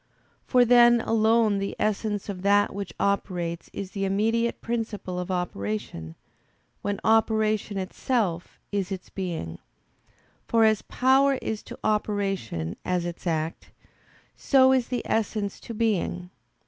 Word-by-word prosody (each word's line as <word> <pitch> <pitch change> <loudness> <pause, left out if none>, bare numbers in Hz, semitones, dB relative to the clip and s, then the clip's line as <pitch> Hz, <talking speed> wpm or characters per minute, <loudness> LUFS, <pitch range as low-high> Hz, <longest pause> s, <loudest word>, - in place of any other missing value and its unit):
For 250 -2 +5
then 240 0 +6
alone 220 -2 +3
the 195 0 -3
essence 210 -1 -1
of 195 -3 -5
that 205 +1 +3
which 200 0 -5
operates 180 -4 -1
is 195 -1 -6
the 195 - -3
immediate 225 +4 +1
principle 220 -6 -3
of 180 - -5
operation, 105 - -4 0.7
when 205 0 -2
operation 220 -2 +2
itself 190 -2 -2
is 200 -2 -2
its 190 -1 -6
being: 165 - -4 0.9
for 230 -1 +3
as 220 -2 +4
power 270 +2 +3
is 220 -4 -4
to - - -10
operation 195 - -1
as 180 -1 -1
its 175 +1 -6
act, 160 0 -2 0.7
so 265 -2 +4
is 255 -3 +1
the 250 -1 -2
essence 210 -2 -1
to - - -9
being. 185 -5 -1
205 Hz, 130 wpm, -26 LUFS, 180-225 Hz, 0.9 s, then